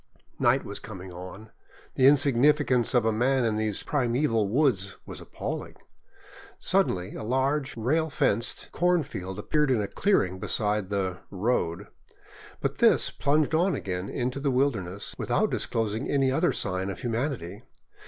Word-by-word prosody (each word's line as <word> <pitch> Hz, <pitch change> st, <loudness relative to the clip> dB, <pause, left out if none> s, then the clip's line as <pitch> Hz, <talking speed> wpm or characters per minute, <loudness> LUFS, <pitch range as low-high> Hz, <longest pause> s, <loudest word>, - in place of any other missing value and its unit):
Night -, -, +3 dB
was -, -, -5 dB
coming 95 Hz, -3 st, -9 dB
on. 95 Hz, +5 st, -10 dB, 0.4 s
The 130 Hz, -, +4 dB
insignificance 140 Hz, -2 st, +3 dB
of 120 Hz, -, +4 dB
man 125 Hz, +3 st, +2 dB
in 110 Hz, -2 st, +1 dB
these 110 Hz, -1 st, -1 dB
primeval 120 Hz, -5 st, +1 dB
woods 110 Hz, -6 st, +1 dB
was -, -, -8 dB
appalling. -, -, -6 dB, 0.8 s
Suddenly 135 Hz, -, 0 dB
a -, -, -6 dB
large, 130 Hz, +3 st, 0 dB
rail 155 Hz, +8 st, +1 dB
fenced 115 Hz, -6 st, 0 dB
cornfield 150 Hz, -, -1 dB
appeared 150 Hz, +7 st, +1 dB
in 125 Hz, -4 st, +2 dB
a 100 Hz, -, -1 dB
clearing 95 Hz, -, +1 dB
beside 105 Hz, -1 st, 0 dB
the 95 Hz, -3 st, -2 dB
" -, -, -35 dB, 0.2 s
road," 90 Hz, -5 st, 0 dB, 0.8 s
but -, -, -2 dB
this -, -, +4 dB
plunged 150 Hz, +2 st, +1 dB
on 175 Hz, +4 st, +2 dB
again 90 Hz, 0 st, -4 dB
into 130 Hz, +1 st, -2 dB
the 140 Hz, 0 st, 0 dB
wilder 130 Hz, -4 st, +1 dB
ness 90 Hz, +3 st, -6 dB
without -, -, +1 dB
disclosing 110 Hz, +2 st, -2 dB
any 135 Hz, -2 st, +2 dB
other 160 Hz, +6 st, +2 dB
sign 95 Hz, 0 st, -1 dB
of 95 Hz, -, -6 dB
humanity. 120 Hz, -, -3 dB
120 Hz, 145 wpm, -27 LUFS, 100-140 Hz, 0.8 s, The